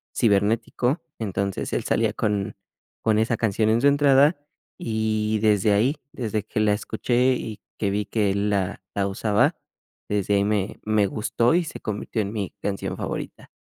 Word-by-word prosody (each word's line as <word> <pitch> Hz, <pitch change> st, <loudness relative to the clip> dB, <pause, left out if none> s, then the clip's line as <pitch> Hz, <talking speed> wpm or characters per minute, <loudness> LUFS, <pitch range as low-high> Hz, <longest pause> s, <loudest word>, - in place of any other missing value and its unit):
Cibernético, 115 Hz, -, +1 dB, 0.2 s
entonces 100 Hz, -3 st, -2 dB
él -, -, 0 dB
salía -, -, +1 dB
con 105 Hz, -1 st, -1 dB, 0.5 s
con 110 Hz, -1 st, +2 dB
esa 110 Hz, +1 st, +1 dB
canción 110 Hz, 0 st, +1 dB
en 110 Hz, +1 st, +3 dB
su 140 Hz, -, +5 dB
entrada, 140 Hz, +2 st, +5 dB, 0.4 s
y 110 Hz, -1 st, -1 dB
desde 105 Hz, -1 st, +3 dB
ahí, 120 Hz, +9 st, +2 dB, 0.2 s
desde 110 Hz, -4 st, -2 dB
que 105 Hz, -, -3 dB
la 105 Hz, -1 st, +3 dB
escuché, 120 Hz, +4 st, +1 dB
y 110 Hz, -3 st, -6 dB, 0.2 s
que 100 Hz, -, 0 dB
vi 105 Hz, +1 st, 0 dB
que 105 Hz, 0 st, +1 dB
él 100 Hz, +1 st, 0 dB
la 100 Hz, -1 st, -1 dB
la 100 Hz, -1 st, +1 dB
usaba, 105 Hz, +1 st, +1 dB, 0.5 s
desde 105 Hz, -1 st, 0 dB
ahí 100 Hz, -, +3 dB
me 105 Hz, -1 st, -1 dB
me 105 Hz, -1 st, +2 dB
gustó 115 Hz, +6 st, +1 dB
y 175 Hz, -, +3 dB
se 160 Hz, -, -7 dB
convirtió 110 Hz, +1 st, -3 dB
en 100 Hz, 0 st, -4 dB
mi 100 Hz, -4 st, -3 dB
canción 100 Hz, -1 st, -3 dB
favorita. -, -, -5 dB
105 Hz, 165 wpm, -24 LUFS, 100-115 Hz, 0.5 s, su